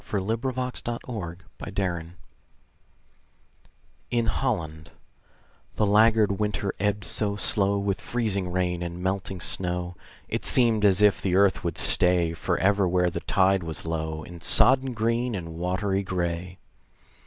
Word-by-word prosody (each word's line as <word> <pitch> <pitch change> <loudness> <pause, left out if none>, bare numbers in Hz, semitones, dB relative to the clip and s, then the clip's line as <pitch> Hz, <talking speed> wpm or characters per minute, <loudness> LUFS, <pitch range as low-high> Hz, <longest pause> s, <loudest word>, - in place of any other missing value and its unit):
FLOOD 110 +3 -3
TIDE 130 -2 -4
OF 110 -7 -5 0.2
FLOWERS 85 -4 -3 2.0
IN 120 -1 0
HOLLAND 85 - -3 0.9
The 105 - +1
laggard 105 -1 +3
winter 100 -2 -2
ebbed 105 +1 -1
so 100 +1 0
slow 100 -1 +1
With 100 -1 -2
freezing 100 -6 -2
rain 90 -1 -1
and 85 +1 -6
melting 95 0 -3
snow, 90 +1 -2 0.3
It - - -3
seemed 115 -4 +4
as 100 0 +4
if 105 -1 +4
the 90 -2 0
earth 100 0 +3
would 85 -2 -3
stay 90 -2 +3
Forever 95 +3 +1
where 90 0 +1
the - - -4
tide 95 -1 +2
was 80 -2 -7
low, 80 -1 -4
In 85 0 -11
sodden 130 +5 +6
green 115 +1 -1
and 85 -3 -6
watery 95 +3 -2
gray. 90 -1 -4
95 Hz, 130 wpm, -25 LUFS, 90-105 Hz, 2.0 s, sodden